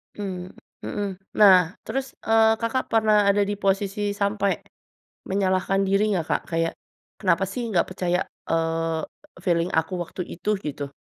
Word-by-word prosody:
Mmm, 185 -3 -5 0.4
mhm, 205 -1 -2 0.3
nah 185 -3 +6
terus, 270 0 -4
eee, 225 0 +5
Kakak 230 +3 -1
pernah 215 -2 +3
ada 200 +1 +4
di 205 +1 -2
posisi 200 +1 0
sampai, 200 -1 +1 0.7
menyalahkan 190 0 +1
diri 205 +2 +2
nggak 170 -4 -1
Kak? - - 0
Kayak, 165 0 0 0.5
“Kenapa 185 -1 +2
sih 240 +5 -4
nggak 175 -5 +2
percaya," 180 -1 0 0.3
eee, 165 0 0 0.4
"feeling 170 -1 +1
aku 160 +3 0
waktu 180 - -6
itu?” 195 +5 -3
Gitu. 145 -4 -5
195 Hz, 140 wpm, -24 LUFS, 175-205 Hz, 0.7 s, nah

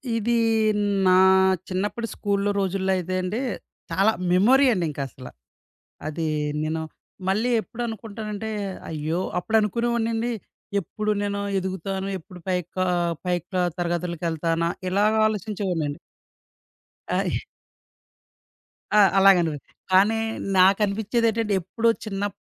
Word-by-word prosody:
ఇది 235 +1 +1 0.7
నా 185 - +6 0.5
చిన్నప్పడి 205 +5 -2
స్కూల్లో 200 0 0
రోజుల్లో 190 0 0
అయితే 185 +1 -3
అండి 185 +5 -2 0.5
చాలా 195 +6 +3 0.2
మెమోరీ 245 +10 +5
అండి 180 -5 0
ఇంకా 145 - -5
అసల. 130 0 -12 0.8
అది 160 +1 -2 0.4
నేను 160 +1 -2 0.5
మళ్ళీ 215 +6 +1
ఎప్పుడనుకుంటానంటే 220 -2 -5 0.4
అయ్యో! 160 +3 -2 0.2
అప్పుడు 220 +5 +1
అనుకునేవాన్నండీ 230 +2 0 0.5
ఎప్పుడు 210 +4 -3
నేను 200 0 -2 0.2
ఎదుగుతాను? 190 +1 -3
ఎప్పుడు 180 +2 -13
పైకా 185 0 -1 0.4
పై 180 0 +2
క్లా 185 -1 -1 0.2
తరగతులకెళ్తానా 170 -1 -1 0.2
ఇలాగ 205 +3 +3
ఆలోచించేవాన్నండీ. 190 -8 -2 1.1
ఆ! - - +1 1.7
ఆ! - - +8 0.2
అలాగనిపిచ్చి 175 -7 +3 0.2
కానీ 205 +4 +5 0.4
నాకనిపిచ్చేదేంటంటే 210 +3 +2
ఎప్పుడూ 225 +6 0 0.2
చిన్నప్ 205 -1 -3
195 Hz, 95 wpm, -24 LUFS, 180-215 Hz, 1.7 s, ఆ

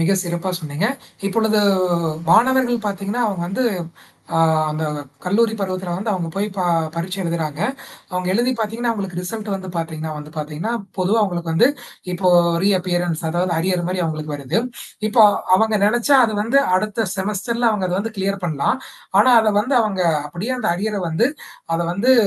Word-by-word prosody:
மிக 165 +4 +3
சிறப்பா 175 +1 -3
சொன்னீங்க. 155 +5 -2 0.4
இப்பொழுது 220 +2 +2 0.7
மாணவர்கள் 240 +1 +4
பார்த்தீங்கன்னா, 200 +4 -2
அவங்க 195 -5 -2
வந்து 225 +8 -1 0.7
அ - - +3 0.3
அந்த 155 +1 -2 0.4
கல்லூரி 220 +5 +2
பருவத்தில 185 -2 -3
வந்து 210 +4 -2
அவங்க 175 -4 -2
போய் 200 +1 0
ப - - -1 0.4
பரீட்சை 180 +3 -3
எழுதுறாங்க. 165 -3 -3 0.5
அவங்க 180 0 -2
எழுதி 240 +5 +2
பார்த்தீங்கன்னா, 225 +2 -1
அவங்களுக்கு 195 -5 -4
ரிசல்ட் 210 +4 -5
வந்து 190 -1 -6
பார்த்தீங்கன்னா 160 -1 -4
வந்து 150 0 -9
பார்த்தீங்கன்னா, 155 +8 -3 0.3
பொதுவா 190 +5 +2
அவங்களுக்கு 175 -4 -2
வந்து 205 +10 +5 0.4
இப்போ 180 +1 +2 0.3
ரீஅப்பியரன்ட்ஸ் 175 -4 0
அதாவது 175 +2 0
அரியர் 180 +1 0
மாரி 185 0 -1
அவங்களுக்கு 155 -2 -3
வருது. 140 +6 -1 0.5
இப்போ 220 +1 +5 0.3
அவங்க 220 +1 +2
நினச்சா 240 +6 +3
அது 220 - -3
வந்து 250 +6 +3 0.2
அடுத்த 215 +2 -1
செமஸ்டர்ல 210 +4 0
அவங்க 205 -4 0
அத 180 - -1
வந்து 220 +1 -5
கிளியர் 195 0 -1
பண்ணலாம். 155 - 0 0.4
ஆனா 255 - +5
அத 215 -1 +2
வந்து 255 +5 0
அவங்க 195 -4 -1 0.2
அப்படியே 175 - -4
அந்த - - -1
அரியரை 205 +2 -2
வந்து 165 +10 +2 0.5
அத 165 - 0
வந்து 220 +8 +3
195 Hz, 160 wpm, -20 LUFS, 175-220 Hz, 0.7 s, வந்து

